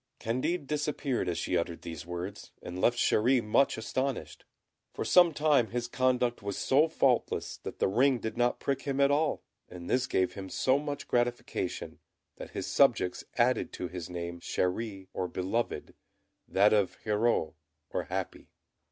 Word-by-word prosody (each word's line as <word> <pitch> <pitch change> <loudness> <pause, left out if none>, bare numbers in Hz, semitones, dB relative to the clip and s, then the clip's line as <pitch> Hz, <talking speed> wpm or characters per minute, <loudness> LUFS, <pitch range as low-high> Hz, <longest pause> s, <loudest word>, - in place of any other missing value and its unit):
Candid 135 +8 -1
disappeared 145 -5 -1
as 85 - -2
she 90 +2 -1
uttered 85 -1 -2
these 85 -1 -7
words, 90 +3 -6
and 90 +1 -6
left 120 0 +3
Chéri 125 +3 +3
much 110 +6 +2
astonished. 130 +4 -3 0.5
For - - -3
some 175 -2 +6
time 145 -5 +3
his 120 +1 -3
conduct 125 -1 +1
was 100 -1 -4
so 145 +4 +3
faultless 135 -6 +1
that - - -8
the - - +2
ring 125 +7 +3
did 110 -2 -5
not 120 0 +1
prick 140 -1 -1
him 140 -1 -2
at 140 0 +5
all, 150 +1 +1 0.3
and 90 -1 -9
this 130 0 +1
gave 95 -1 +1
him 95 -2 -7
so 130 +7 +2
much 145 -1 -5
gratification, 120 0 -2 0.4
that - - -8
his - - -4
subjects 90 - +2
added 125 0 +2
to 90 - -4
his 90 -1 -6
name 85 0 -5
Chéri, 95 +2 -2
or 90 - -2
Beloved, 95 +7 -2 0.5
that 100 +3 +4
of 100 -4 +2
Heureux, 105 -6 +1 0.4
or - - -1
Happy. - - -4
120 Hz, 160 wpm, -30 LUFS, 95-135 Hz, 0.5 s, some